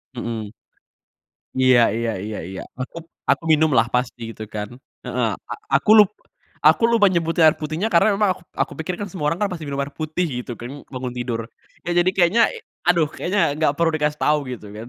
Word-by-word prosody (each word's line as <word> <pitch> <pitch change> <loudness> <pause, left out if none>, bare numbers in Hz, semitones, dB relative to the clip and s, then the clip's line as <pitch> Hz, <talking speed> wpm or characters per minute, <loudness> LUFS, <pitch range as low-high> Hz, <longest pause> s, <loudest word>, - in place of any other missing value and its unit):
Mhm. 115 -3 -4 1.0
Iya 130 -1 +5 0.2
iya 115 0 -1
iya 105 -1 -5
iya. 95 0 -6 0.2
Aku 130 +6 -6 0.3
aku - - 0
minumlah 150 -7 +4
pasti, 125 0 -1
gitu 110 - -8
kan. 105 -1 -3 0.4
Heeh. - - 0 0.2
A - - 0 0.2
aku - - -5
lup 210 -2 +7 0.6
aku - - +5
lupa 230 -3 +5
nyebutnya 165 -1 +1
air 155 - +4
putihnya 155 +7 -2
karena 170 - +5
emang 210 -2 +3
aku - - -17
p - - -63
aku - - -2
pikir 180 +3 -3
kan 205 - -3
semua 175 -5 -4
orang 170 - -3
kan 210 - +2
pasti 165 -3 -5
minum 140 0 -3
air 140 +1 -9
putih, 155 +3 -1 0.2
gitu 120 - -8
kan, 120 - -7 0.2
bangun 125 -1 -4
tidur. 120 -2 -2 0.5
Ya 175 - -1
jadi 185 - +3
kayaknya 190 +5 +4
e 460 - -8 0.3
aduh 170 -4 +4
kayaknya 200 +3 -1 0.2
nggak 155 -2 +3
perlu 170 -1 +2
dikasih 150 0 -1
tahu 150 0 +4
gitu 110 -4 -7
kan. 110 +2 -7
150 Hz, 200 wpm, -22 LUFS, 120-175 Hz, 1.0 s, lup